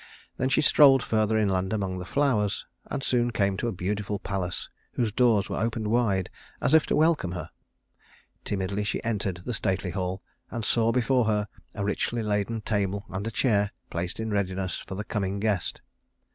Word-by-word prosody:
Then 130 - +1
she 145 - +3
strolled 140 -3 +6
further 110 0 +1
inland 95 -3 +1
among 95 -3 -1
the 90 - -6
flowers, 120 -8 +1 0.2
and 135 - -3
soon 120 -2 +2
came 100 -4 +1
to 120 - -1
a - - 0
beautiful 100 +2 -2
palace 95 -3 -3 0.3
whose 115 -4 0
doors 115 -3 +3
were - - -3
opened 110 -1 -1
wide 105 -5 +1 0.3
as - - +1
if 160 -2 +6
to - - +1
welcome 155 - +2
her. 90 - -6 0.9
Timidly 100 +1 -1
she 105 - -2
entered 100 -6 -1
the 125 - -2
stately 95 -4 0
hall, 95 0 -3 0.3
and 115 -2 -3
saw 115 -1 +3
before 125 0 +2
her 105 -1 +1 0.3
a 100 -1 -2
richly 115 +3 -1
laden 105 +2 -1
table 100 -1 -1
and 95 +3 -3
a - - -2
chair 105 -3 +2 0.2
placed 90 +4 -3
in 110 -1 -2
readiness 95 -2 -1
for 95 - -7
the 105 - -3
coming 100 -2 -2
guest. 105 -4 -1
105 Hz, 180 wpm, -27 LUFS, 95-115 Hz, 0.9 s, strolled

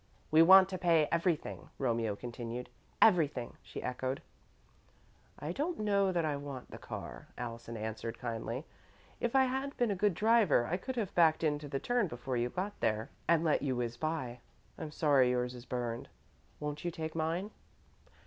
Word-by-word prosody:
"We 155 +1 +7
want 190 +2 +9
to 185 -1 -4
pay 165 -4 +4
everything," 170 -1 -1
Romeo 115 -5 0
continued. 120 +1 -6 0.3
"Everything," 150 - +3
she - - -8
echoed. 130 +1 -3 1.1
"I 150 - -4
don't 315 - -2
know 200 -2 +2
that 170 -3 +1
I 150 -2 0
want 140 -3 -7
the - - -8
car," - - -7
Allison 115 -1 -6
answered, 110 +1 -4
kindly. 115 +3 -4 0.5
"If 240 +2 -1
I 265 - +7
had 265 +2 -2
been 240 -3 +2
a - - 0
good 200 -1 +2
driver, 215 - +4
I 175 +8 -1
could 260 +7 -5
have 220 -6 -2
backed 165 -2 +4
into 150 -1 0
the 135 -1 -2
turn 245 - +1
before 125 -2 -4
you 120 0 +1
got 190 +8 -4
there 110 +1 0 0.2
and 170 -1 +4
let 155 -3 +2
you 135 -3 0
whiz 120 -1 -2
by. 130 -5 -3 0.4
I'm 155 - -6
sorry 145 -4 +4
yours 125 0 0
is 120 0 -10
burned. 120 -2 -3 0.5
Won't 150 0 -4
you 175 - 0
take 160 -1 -5
mine?" 165 +6 -1
150 Hz, 175 wpm, -33 LUFS, 125-185 Hz, 1.1 s, want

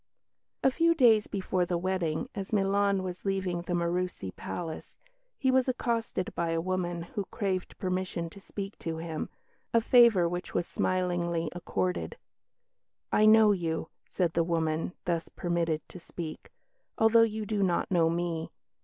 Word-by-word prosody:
A 265 - +5
few 335 +4 +3
days 230 -7 +5
before 185 -2 -1
the 175 0 0
wedding, 185 +2 -1
as 195 -3 -5
Milan 200 -1 +2
was 185 -1 -6
leaving 190 -3 -1
the 175 +1 -4
Murussi 175 - -2
Palace, 165 -3 -6 0.4
he 260 - +2
was 260 0 +3
accosted 230 -6 -1
by 170 -1 -1
a 165 0 0
woman, 175 -1 -2
who 195 +3 -4
craved 190 -3 -2
permission 185 -2 -2
to 200 - -12
speak 195 +1 -7
to 165 -1 -4
him, 160 -1 -4 0.5
a - - +7
favour 230 -6 +6
which 175 +1 -5
was 175 - +1
smilingly 175 -3 -1
accorded. 180 +1 -2 0.9
"I 215 - +5
know 215 -1 +7
you," 165 -4 -1
said 175 -3 -1
the 170 - +2
woman, 165 0 -1
thus 170 -1 -1
permitted 170 -3 -1
to 180 - -10
speak, 165 -2 -7 0.5
"although 225 +1 +6
you 220 -1 +1
do 210 -1 -1
not 180 -1 +1
know 165 -3 +4
me. 170 -1 -2
180 Hz, 155 wpm, -29 LUFS, 170-205 Hz, 0.9 s, a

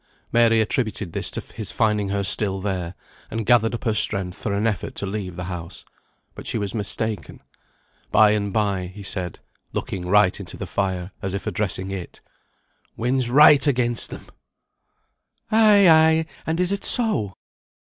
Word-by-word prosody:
Mary 115 -1 +4
attributed 110 -5 -2
this - - 0
to - - -4
his 110 -4 -5
finding 105 -3 0
her 100 0 -1
still 95 0 +3
there, 95 -3 -4 0.3
and 115 0 -4
gathered 120 0 +3
up - - -8
her 110 - +1
strength 95 -3 0
for 105 - -4
an 100 +2 -1
effort 105 -3 -2
to - - -4
leave 95 -3 -5
the 90 - -6
house. 85 -2 -7 0.5
But - - -9
she - - 0
was 100 -2 -3
mistaken. 110 0 -3 0.7
By 110 0 +5
and 100 -1 -1
bye, 95 -3 -1
he 105 - -9
said 90 -3 -3 0.4
(looking 90 -2 -4
right 105 0 +3
into - - -8
the - - -5
fire, 95 -2 -3
as 95 0 -3
if 100 - -5
addressing 95 -2 -1
it), 95 -3 -7 0.8
"Wind's 125 +1 0
right 145 +2 +6
against 120 -4 +1
them!" - - -9 1.3
"Ay, 215 -3 +6
ay, 160 0 +5 0.2
and 160 +1 -1
is 180 +1 +1
it 200 0 -3
so?" 210 - +2
105 Hz, 165 wpm, -22 LUFS, 95-120 Hz, 1.3 s, right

